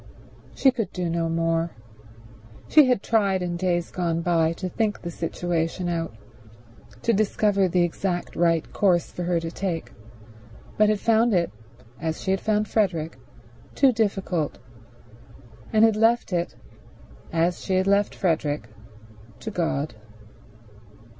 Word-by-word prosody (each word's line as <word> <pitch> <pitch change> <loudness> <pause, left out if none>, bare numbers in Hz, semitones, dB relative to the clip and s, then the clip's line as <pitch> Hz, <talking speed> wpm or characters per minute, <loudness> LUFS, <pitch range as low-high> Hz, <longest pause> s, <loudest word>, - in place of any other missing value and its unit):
She 265 - +4
could 230 -4 -3
do 175 -2 -2
no 165 -1 0
more. 165 0 0 1.0
She 305 -2 +7
had 250 -5 +1
tried 200 -5 +2
in 175 -1 -2
days 175 -1 -1
gone 170 -2 -1
by 165 -2 +2
to 185 +2 -5
think 210 +2 -1
the 170 - -4
situation 170 +1 -2
out, 165 -1 -2 0.9
to 230 - +3
discover 200 -1 +2
the 180 0 +2
exact 175 +1 -2
right 165 -1 +1
course 180 -4 +2
for - - -6
her 175 -1 +1
to 165 0 -5
take, 175 -3 -3 0.8
but 215 0 +4
had 215 -1 +1
found 225 0 +3
it, 170 -1 +1 0.5
as 160 -1 -3
she 190 - -2
had 190 - 0
found 215 -1 +1
Frederick, 170 -8 0 0.6
too 270 -2 +5
difficult, 195 - -1 1.1
and 220 0 +6
had 220 -2 +3
left 225 -1 +2
it, 175 0 -1 0.8
as 170 +2 0
she 190 - 0
had 185 0 +2
left 200 +1 +2
Frederick, 150 - -1 0.7
to - - -5
God. 155 -4 -1
180 Hz, 140 wpm, -25 LUFS, 165-205 Hz, 1.1 s, She